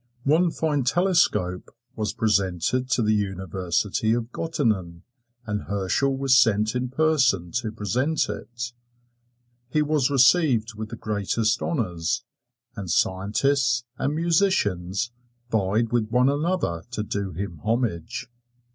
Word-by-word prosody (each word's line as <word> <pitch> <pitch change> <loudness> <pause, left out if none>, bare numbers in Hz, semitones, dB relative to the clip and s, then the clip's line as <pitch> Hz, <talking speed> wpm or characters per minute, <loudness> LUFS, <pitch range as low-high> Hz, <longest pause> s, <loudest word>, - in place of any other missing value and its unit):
One 165 +5 +3
fine 150 -4 0
telescope 140 - +1 0.3
was 110 -1 -2
presented 105 +4 +1
to 120 -2 +2
the 110 0 +3
University 95 +1 -1
of 120 0 -2
Gottingen, 95 - -2 0.4
and 105 -1 -2
Herschel 100 +8 0
was 135 -1 +3
sent 110 -3 +4
in 125 0 -2
person 130 - +2
to 110 -2 -4
present 125 - 0
it. 120 0 -6 1.0
He 150 +3 +2
was 150 -3 +1
received 130 -4 +4
with 110 0 -6
the 115 - -6
greatest 110 +1 -1
honors, 90 - -1 0.5
and 100 -4 -6
scientists 120 +9 +1 0.2
and 145 +2 0
musicians 120 - +1 0.4
vied 110 +2 +1
with 115 -3 +1
one 125 +3 +3
another 145 - -1
to 105 - -2
do 100 -3 -3
him 85 -2 -5
homage. 110 -8 -1
115 Hz, 120 wpm, -24 LUFS, 100-135 Hz, 1.0 s, sent